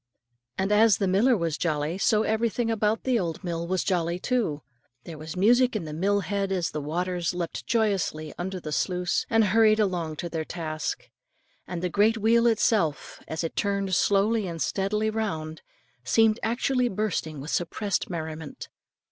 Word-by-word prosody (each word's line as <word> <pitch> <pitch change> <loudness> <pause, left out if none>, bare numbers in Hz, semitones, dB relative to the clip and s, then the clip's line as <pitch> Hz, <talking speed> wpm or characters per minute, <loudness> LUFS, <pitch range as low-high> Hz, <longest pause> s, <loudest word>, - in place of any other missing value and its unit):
And 190 +2 0
as 210 -1 +5
the 195 - 0
miller 220 +7 +3
was 165 -4 -2
jolly, 155 +1 -1
so 215 -1 +3
everything 230 +1 0
about 215 0 0
that 255 -3 +2
old 170 -1 -4
mill 170 -1 -3
was 185 -1 0
jolly 170 -2 0
too. 195 - -1 0.4
There 160 -3 -9
was 155 +2 -7
music 240 +5 +4
in 210 - -1
the 155 - -6
mill 200 +5 +1
lead 200 -1 0
as 180 -3 -1
the 150 - -4
waters 175 +3 -2
leapt 170 -2 -4
joyously 195 -9 0
from - - -16
under 190 0 -4
the 155 -3 -7
sluice, 180 +3 0
and 225 -1 +4
hurried 215 +1 +4
along 175 -6 0
to 175 - -4
their 160 -1 -3
task, 155 -2 -4 0.6
and 175 0 -5
the - - +2
great 210 +5 +3
wheel 230 +2 +3
itself, 210 -8 +1
as 160 +1 -3
it 165 - -4
turned 200 -1 -1
slowly 205 +3 +2
and 165 -1 -5
steadily 210 +5 0
round, 160 -8 -3 0.4
seemed 220 - +3
actually 245 +2 +1
bursting 185 -7 -2
with 145 +4 -6
suppressed 190 +3 -1
merriment. 160 -3 -6
190 Hz, 175 wpm, -26 LUFS, 165-215 Hz, 0.6 s, as